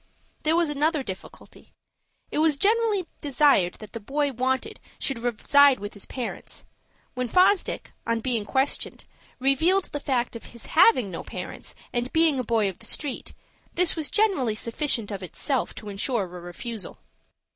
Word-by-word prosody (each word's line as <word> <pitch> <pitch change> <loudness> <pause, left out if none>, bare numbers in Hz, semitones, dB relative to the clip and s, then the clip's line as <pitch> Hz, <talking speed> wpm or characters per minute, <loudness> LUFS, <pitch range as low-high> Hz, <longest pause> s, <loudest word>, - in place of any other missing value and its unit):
There 315 +1 +2
was 340 -2 +2
another 295 0 +1
difficulty. 190 -5 -10 0.6
It - - -1
was 310 -2 +4
generally 425 0 +2 0.2
desired 280 -10 +3
that 215 - -12
the 230 - -5
boy 285 +6 -1
wanted 260 - -1 0.2
should 270 -4 -2
reside 255 +4 +4
with 205 +1 -6
his 205 - -10
parents. 250 -3 -6 0.5
When 250 -1 -2
Fosdick, 370 - +2
on 230 0 +1
being 230 -2 0
questioned, 265 +6 -1 0.3
revealed 320 +9 +2
the 290 - -3
fact 255 -4 -1
of 230 - -8
his 235 -2 -11
having 230 -3 +5
no 165 - -5
parents, - - -8 0.2
and 245 +1 -1
being 320 -4 +3
a - - 0
boy 225 -3 +2
of 190 - -5
the - - -6
street, 285 -4 -3 0.4
this 360 -1 +3
was 315 -3 -1
generally 375 - +2
sufficient 230 -1 -1
of 200 -1 -5
itself 255 - -2
to 215 - -9
insure 205 +3 -1
a - - -6
refusal. 180 +5 -7
260 Hz, 160 wpm, -25 LUFS, 225-300 Hz, 0.6 s, having